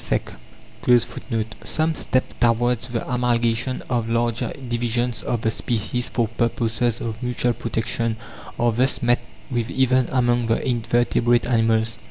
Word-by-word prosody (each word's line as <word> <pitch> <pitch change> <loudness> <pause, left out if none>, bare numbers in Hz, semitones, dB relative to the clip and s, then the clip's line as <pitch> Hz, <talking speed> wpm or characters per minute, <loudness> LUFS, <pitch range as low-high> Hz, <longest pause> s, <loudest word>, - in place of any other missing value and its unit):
(10) - - +2 1.4
Some 160 +1 0
steps 130 -4 -1
towards 120 0 +2
the 120 -2 -3
amalgamation 120 0 +1
of 120 -3 -1
larger 115 0 0 0.2
divisions 120 0 -1
of 120 - -2
the 110 - +1
species 120 +2 -1
for 120 -2 0
purposes 115 0 0
of 110 0 -4
mutual 125 -1 0
protection 115 0 -1 0.4
are 120 0 +3
thus 125 +4 +1
met 120 +1 +4 0.3
with 120 -1 -1
even 130 -2 +2
among 120 -2 +2
the 115 - +2
invertebrate 120 0 +2
animals. 115 -2 +1
120 Hz, 130 wpm, -23 LUFS, 115-125 Hz, 1.4 s, met